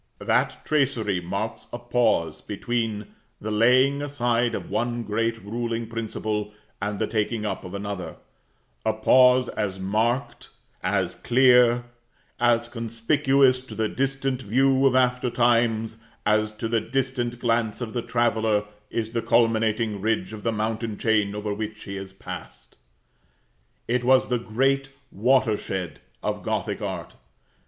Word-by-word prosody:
That - - 0
tracery 125 -11 +1
marks 100 +6 -4
a - - -4
pause 120 -10 +1
between 110 0 -3 0.3
the 110 - -4
laying 130 +6 +4
aside 120 -4 0
of - - -5
one 120 0 -1
great 115 +2 -1
ruling 115 +2 -3
principle, 110 -2 -3 0.3
and 105 +1 -2
the - - 0
taking 110 0 -1
up - - -3
of 90 +2 -7
another; 100 -4 -5 0.7
a 110 - +1
pause 125 +3 +5
as 95 -3 -3
marked, 110 +7 -1 0.3
as - - 0
clear, 125 -1 +4 0.6
as 120 -1 +3
conspicuous 125 +3 +2
to 130 - -11
the 110 -1 0
distant 135 +1 -1
view 135 +4 +3
of 130 - +2
after 125 -1 +2
times, 115 -2 +2 0.3
as 110 +1 +2
to 110 +1 -4
the 115 -1 +1
distant 125 -1 -2
glance 115 -2 0
of 115 -3 -5
the 120 - -1
traveller 115 -3 +1 0.3
is 110 -1 -3
the 115 -1 -1
culminating 110 -3 +2
ridge 110 +1 -1
of 105 - -7
the 115 - 0
mountain 110 0 -2
chain 105 -2 +1
over 105 0 -3
which 105 0 -5
he 100 - -6
has 95 0 -7
passed. 95 - -10 1.1
It 125 +1 0
was 130 +1 +4
the 125 -1 +1
great 135 +5 0 0.2
watershed 105 - 0 0.2
of - - -2
Gothic - - -2
art. - - -5
115 Hz, 140 wpm, -25 LUFS, 105-125 Hz, 1.1 s, pause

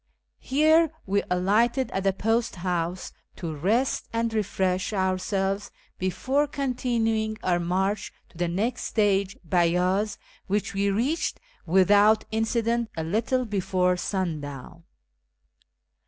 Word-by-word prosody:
Here 315 +4 +4 0.2
we 200 +1 +1
alighted 220 +8 +2
at 195 - -2
the 195 - +4
post 225 +4 0
house 180 0 -3 0.2
to 165 -3 -5
rest 220 - 0
and 230 0 -1
refresh 190 -2 0
our 190 -2 +1
selves 195 +1 -1 0.3
before 265 +10 0
continuing 230 -5 -1
our 175 -1 +2
march 190 +4 -1 0.2
to - - -18
the 175 - +1
next 215 +8 -1
stage, 200 -3 +1
Beyaz, 180 +4 +1 0.3
which 205 +1 -1
we 200 +1 +1
reached 250 +11 0 0.3
without 205 +4 +5
incident 230 +1 0
a 160 - -1
little 225 +9 0
before 185 -3 +1
sundown. 165 -4 -4
200 Hz, 115 wpm, -26 LUFS, 185-225 Hz, 0.3 s, without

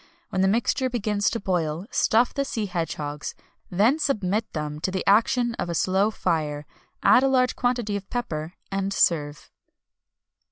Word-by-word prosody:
When 185 - -1
the 190 - +4
mixture 235 +5 +1
begins 210 -4 0
to 230 - -3
boil, 175 -3 -1
stuff 235 +3 +3
the 280 - 0
sea 225 -5 -3
hedgehogs, 150 -5 -4 0.3
then 220 - +3
submit 215 -7 0
them 150 -1 -4
to 175 - -1
the 185 0 -3
action 230 +4 +3
of - - -2
a 170 - -2
slow 190 +5 +2
fire; 155 -7 -2 0.4
add - - +6
a 270 - +3
large 255 -1 +2
quantity 240 -4 0
of 195 -1 -6
pepper, 170 -9 -4 0.2
and 195 0 -1
serve." 150 -5 0
195 Hz, 160 wpm, -25 LUFS, 170-235 Hz, 0.4 s, add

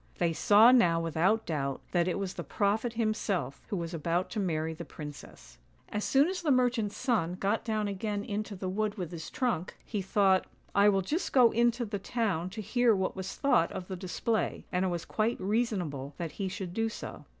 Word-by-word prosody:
They 170 -2 +1
saw 215 +8 +6
now 175 -10 +5
without 165 +7 +1
doubt 140 -4 -2
that 175 -1 +2
it 180 - 0
was 195 -2 -3
the - - -5
prophet 220 +3 0
himself, 215 - -1
who 210 - -3
was 170 0 -4
about 170 +3 -1
to 220 - -2
marry 160 -4 -1
the 165 +2 -7
princess. 145 - -10 0.3
As 210 0 -2
soon 275 +3 +4
as 370 0 -3
the 325 - -1
merchant's 245 -5 +2
son 220 -10 0
got 200 +4 0
down 215 -2 -1
again 205 +1 -2
into 210 0 -3
the 185 0 -5
wood 210 +2 -1
with 180 -3 -4
his 165 -2 -6
trunk, 235 -9 -2
he 210 -3 -3
thought, 190 0 +3 0.2
" - - -37
I 200 +1 +6
will 195 -2 +2
just 310 - -2
go 245 -3 +6
into 240 +1 +2
the 205 -2 -4
town 195 -6 -1
to 210 +3 -6
hear 240 +2 +3
what 190 -1 -1
was 190 0 -5
thought 220 - +2
of 180 - -6
the 190 - -3
display," 190 +5 -2
and 180 +1 +1
it - - +1
was 175 -2 -3
quite 225 +2 0
reason 210 0 0
able 140 -2 -6
that 170 -3 -4
he 195 +5 -3
should 185 -2 -5
do 225 +2 0
so. - - -8
200 Hz, 215 wpm, -30 LUFS, 175-225 Hz, 0.3 s, saw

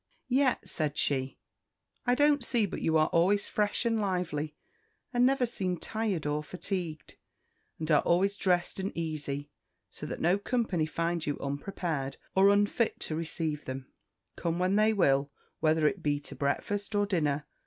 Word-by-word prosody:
"Yet," 260 0 +2
said 150 -2 -2
she, 135 -2 0 0.7
"I 245 - +4
don't 290 +1 +4
see 230 -4 +2
but 195 - -5
you 160 0 +3
are 155 - +5
always 190 +5 +3
fresh 210 +3 0
and 225 -2 +2
lively, 175 -6 -2 0.6
and 245 +1 +5
never 270 -1 +2
seem 185 -6 -2
tired 210 -5 -2
or 150 0 0
fatigued; 175 -2 -5 0.6
and 160 0 -3
are 150 - +6
always 190 +4 +2
dressed 180 -2 +1
and 190 +1 -2
easy, 145 -3 -3 0.4
so - - -7
that - - -5
no 180 +4 +3
company 200 -8 0
find 165 +1 -1
you 145 - -2
unprepared, 140 -1 -3 0.2
or 195 +1 +6
unfit 205 +3 +2
to 155 - -3
receive 160 -2 -3
them, 130 0 -6 0.4
come 170 0 -1
when 185 +2 +2
they 215 +1 +4
will, 140 -8 +2 0.3
whether 155 0 +3
it 195 +3 -1
be 145 -2 +1
to - - -8
breakfast 205 +9 -1
or 205 0 +3
dinner." 150 -7 0
175 Hz, 165 wpm, -30 LUFS, 150-205 Hz, 0.7 s, are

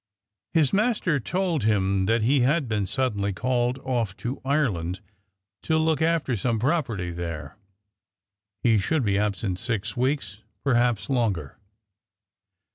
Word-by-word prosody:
His 155 -4 +3
master 205 - +2
told 175 - -1
him 95 -3 +2
that 115 0 +2
he 135 +5 +3
had 140 +3 +2
been 105 -4 -1
suddenly 105 -3 0
called 125 +3 0
off 120 -7 -1
to 125 +3 -4
Ireland 105 - 0 0.6
to 160 - +1
look 160 -1 +1
after 160 -6 +1
some 115 +2 0
property 115 - 0
there. 85 -4 -5 1.1
He 115 -3 +4
should 135 +7 0
be 100 -1 +2
absent 100 -3 -1
six 110 -3 -2
weeks 130 -5 -1 0.2
perhaps 120 -5 +2
longer. 105 - -1
120 Hz, 125 wpm, -25 LUFS, 100-140 Hz, 1.1 s, He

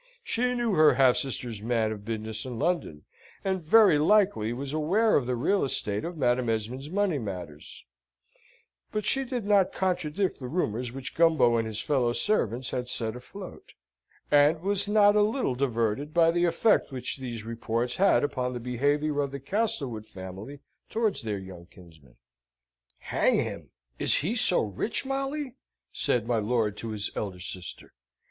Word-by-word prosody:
She 250 - 0
knew 240 -2 0
her 155 -5 +5
half 130 -1 +5
sister's 120 -5 -3
man 115 -1 0
of 105 -2 -7
business 110 0 -4
in 125 -3 -6
London, 115 - -1 0.4
and 190 -1 0
very 180 -1 +5
likely 190 - +3
was 135 +3 -5
aware 190 +9 +2
of 125 - +1
the 125 - 0
real 140 +4 +1
state 105 -3 -1
of 170 0 -5
Madame 125 -3 +1
Esmond's 115 +6 -3
money 190 -4 0
matters; 90 - -8 1.1
but 215 -1 -2
she 270 +5 +2
did 245 -4 -4
not 200 -2 +3
contradict 180 0 -1
the 130 - -6
rumours 125 - -2
which 135 0 -6
Gumbo 160 -8 +4
and 115 -1 -1
his 110 0 -3
fellow 125 -5 +1
servants 125 - 0
had 125 -1 -3
set 115 -2 -2
afloat; 185 +10 -11 0.6
and 150 +2 +4
was 200 +1 +2
not 205 0 +5
a 210 - +5
little 215 - +1
diverted 125 +2 -1
by 165 -1 +5
the 175 +1 +1
effect 190 +1 +2
which 130 0 -3
these 120 -4 -6
reports 115 +1 -2
had 195 -4 +4
upon 130 -3 -2
the 120 - -4
behaviour 145 +5 0
of 140 - -2
the 140 +1 -6
Castlewood 135 - -2
family 95 +9 -9 0.3
towards 220 -3 0
their 105 -3 -3
young 95 -3 -10
kinsman. 80 -10 -18 0.8
"Hang - - +1
him! - - -4 0.3
Is - - +2
he 170 +10 0
so 220 -6 +3
rich, 105 - -1
Molly?" 275 0 -3 0.4
said 120 -3 0
my 115 -1 +1
lord 110 -1 0
to 115 - -6
his 105 -1 -3
elder 95 -4 -4
sister. 90 0 -7
135 Hz, 165 wpm, -27 LUFS, 115-185 Hz, 1.1 s, her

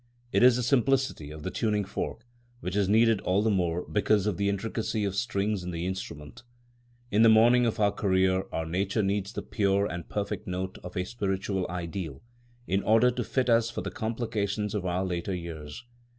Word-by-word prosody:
It - - +2
is 125 -1 +7
the 125 - -1
simplicity 130 - +1
of 75 0 -9
the - - -3
tuning 105 -3 0
fork, 110 +3 -5 0.3
which 90 -3 -4
is 100 -2 +2
needed 115 -1 +4
all 95 +3 +1
the 110 - +2
more 90 -3 0
because 105 -1 +2
of 105 -5 0
the 100 +1 +1
intricacy 110 +2 -2
of 100 - -1
strings 100 -2 -1
in 90 - -5
the 85 0 -3
instrument. 80 - -6 0.7
In 105 - +3
the 115 - +8
morning 120 +2 +6
of 110 - -2
our 100 -1 +4
career 95 -2 +1
our 80 - -2
nature 95 +6 0
needs 100 0 -1
the - - -5
pure 100 -2 +1
and 85 -4 -4
the - - -29
perfect 105 -1 -3
note 95 +1 -4
of 90 0 -7
a 90 - 0
spiritual 95 -3 -2
ideal 85 -4 -5 0.4
in 95 -2 0
order 115 +4 +4
to 120 0 -3
fit 130 +2 0
us 115 -1 +3
for - - -4
the - - -5
complications 105 -2 -2
of 100 -3 -2
our 90 +2 0
later 90 +1 -2
years. 85 +4 -7
100 Hz, 200 wpm, -28 LUFS, 90-110 Hz, 0.7 s, the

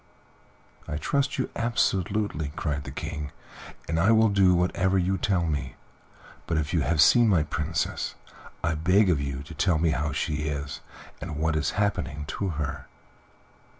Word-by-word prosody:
"I 75 - -3
trust 140 - 0
you 130 - -2
absolutely," 100 -7 0
cried 75 -2 -2
the - - -6
King, 75 -2 -5 0.6
"and 80 0 0
I 95 +6 +4
will 110 0 +5
do 95 -2 +4
whatever 95 +2 +1
you 95 +1 +1
tell 95 -3 +1
me; 70 -5 -3 0.7
but 80 - 0
if 75 -2 -2
you - - +2
have 80 +4 0
seen 115 - +6
my 90 -7 +4
Princess 75 +2 -2 0.5
I 85 +1 +1
beg 90 +5 +3
of 75 -5 +1
you 70 -1 -4
to 85 - -10
tell 85 +2 +2
me 80 0 +2
how 75 +2 -1
she 75 +1 -2
is 70 -1 -4 0.4
and - - -5
what 80 +1 0
is 75 -3 0
happening 75 -8 -1
to 100 - -2
her. 75 -5 -4
80 Hz, 165 wpm, -26 LUFS, 75-95 Hz, 0.7 s, seen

